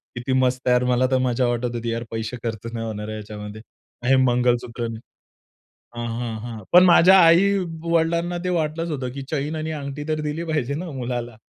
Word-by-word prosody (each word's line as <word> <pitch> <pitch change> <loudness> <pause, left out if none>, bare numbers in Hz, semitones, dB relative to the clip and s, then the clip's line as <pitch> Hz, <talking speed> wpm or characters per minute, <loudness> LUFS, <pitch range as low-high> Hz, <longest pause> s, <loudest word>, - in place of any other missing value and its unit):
किती 120 +2 -2
मस्त 130 0 0
आहे 125 - +5
यार, 125 - +2
मला 130 +1 +2
तर 130 - +4
मज्जा 125 +1 +1
वाटत 120 0 -1
होती. 115 0 -3
यार 115 +1 -3
पैसे 115 +2 -4
खर्च 115 0 -4
नाही 115 -1 -4
होणार 105 -1 -5
आहे 110 - -5
याच्यामध्ये 105 0 -8 0.4
आणि 135 +2 +4
मंगळसूत्र 120 -1 +1
नाही. 115 -1 -6 1.0
हां, 120 0 -3
हां, 115 -2 -3
हां. 115 -2 -7
पण 180 +1 +8
माझ्या 185 +2 +7
आई-वडिलांना 170 -2 +2
ते - - -1
वाटलंच 165 0 -1
होतं, 130 -4 -3
की 135 0 -6
चैन 150 +1 -2
आणि 155 0 -3
अंगठी 145 0 -5
तर 155 0 0
दिली 150 +3 -3
पाहिजे 150 -4 -1
ना 170 +2 -5
मुलाला. 120 -3 -4
130 Hz, 195 wpm, -23 LUFS, 120-160 Hz, 1.0 s, पण